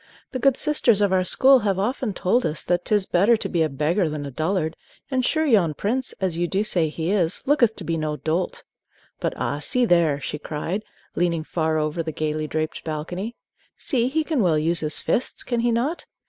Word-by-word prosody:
The 255 - -3
good 275 +1 +3
sisters 250 -8 +2
of 200 -2 +2
our 185 -1 +3
school 265 +8 +5
have 200 -4 0
often 235 +3 -1
told 235 +9 +1
us 155 0 -2
that 175 0 0
't 215 - +2
is 205 -2 +1
better 200 +7 +3
to - - -3
be 170 - 0
a 160 - +2
beggar 155 +6 0
than 150 -1 -4
a 140 - -6
dullard; 160 +2 -1 0.4
and 260 -1 +1
sure 315 +5 +1
yon 195 - +3
prince, 250 - -1
as 190 -4 -2
you 175 +1 0
do 195 +4 0
say 170 -7 +1
he 160 +3 -3
is, 185 -3 0
looketh 245 -6 +3
to 195 - -8
be 165 0 -1
no 155 -1 -2
dolt. 165 +4 -2 0.6
But - - -2
ah, 145 - -2
see 250 +11 +2
there!" 170 -8 +3
she 150 +2 -5
cried, 160 +7 -3 0.3
leaning 170 -2 0
far 160 -1 -1
over 155 +2 -1
the 160 -1 -4
gayly 155 0 -2
draped 155 +1 -3
balcony; 175 +8 -4 0.4
"see, 245 -5 +1
he 315 +4 0
can 305 -5 0
well 170 -5 +3
use 165 +3 +1
his 155 -1 +2
fists, 245 - -1
can 240 -2 -1
he 240 +1 +2
not! 260 +9 -1
180 Hz, 215 wpm, -23 LUFS, 155-235 Hz, 0.6 s, school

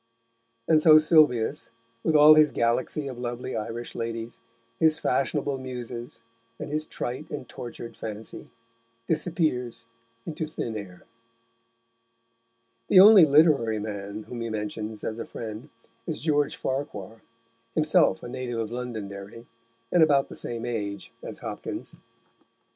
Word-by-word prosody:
And 155 -1 +5
so 155 -1 +8
Sylvius, 150 -5 +3 0.3
with 160 - +1
all 150 +1 +9
his 155 -1 +6
galaxy 125 +5 0
of 130 -3 -7
lovely 120 +1 -4
Irish 115 +2 -5
ladies, 115 0 -5 0.4
his 160 -1 +4
fashionable 135 +1 -1
Muses, 120 -2 -7 0.3
and - - -7
his 155 +1 -1
trite 130 +6 -5
and 145 -4 -6
tortured 120 -1 -8
fancy, 110 0 -8 0.6
disappears 155 -7 -1 0.4
into 160 -1 -4
thin 115 -7 -5
air. 95 -4 -8 1.8
The 185 - +7
only 200 -3 +9
literary 140 -7 +4
man 105 0 -5
whom 120 +1 -7
he 115 - -3
mentions 105 0 -5
as 110 +1 -4
a - - -3
friend 115 +5 -8 0.4
is - - -3
George 145 -1 +1
Farquhar, 115 -6 -5 0.5
himself 155 0 +3
a - - -6
native 120 -1 -4
of 110 -1 -3
Londonderry, 110 -3 -7 0.5
and 175 - +4
about 145 -3 +4
the - - -8
same 120 0 -5
age 100 -5 -4
as - - -7
Hopkins. - - -6
120 Hz, 130 wpm, -26 LUFS, 110-150 Hz, 1.8 s, all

